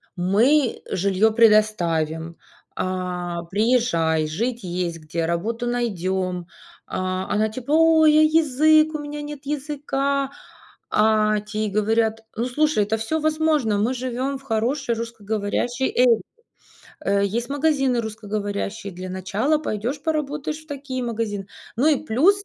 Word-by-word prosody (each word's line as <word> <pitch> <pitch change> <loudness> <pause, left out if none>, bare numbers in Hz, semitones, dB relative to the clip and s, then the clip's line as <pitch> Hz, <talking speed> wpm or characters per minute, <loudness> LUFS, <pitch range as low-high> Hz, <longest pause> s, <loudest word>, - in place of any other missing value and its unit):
"Мы 230 +10 +2
жилье 200 +3 +2
предоставим, 170 -8 +2 0.4
а, 180 -2 -3
приезжай, 170 -6 +1
жить 230 +9 -2
есть 175 -2 -3
где, 160 +1 -3
работу 220 +9 -2
найдем". 190 -6 -2 0.4
А 185 0 -2
она 215 +1 +2
типа: 250 +5 -6
"Ой, 315 -1 +6
а - - +7
язык? 310 0 +4
У - - -2
меня 295 0 -6
нет 295 -1 -8
языка". 280 -1 -1 0.6
А 215 0 +3
те 210 +1 -6
ей - - -2
говорят: 220 +2 +1
"Ну, 230 - -1
слушай, 300 -2 +2
это 215 +2 -1
всё 225 +9 -2
возможно, 310 -8 +1
мы 225 +6 +1
живем 255 +2 -3
в 270 - -18
хорошей 240 +2 -1
русскоговорящей 225 +2 -2 0.2
area 235 -3 +5 0.9
Э, 200 0 +2
есть 235 +4 -2
магазины 275 -4 +1
русскоговорящие, 210 -2 -4
для 185 +1 -7
начала 200 - 0
пойдешь 250 0 -3
поработаешь 300 -1 -2
в 310 - -30
такие 275 -2 -4
магазины". 220 -4 -3 0.3
Ну 255 +6 +2
и 305 -1 +1
плюс, 355 - +3
225 Hz, 130 wpm, -23 LUFS, 200-280 Hz, 0.9 s, а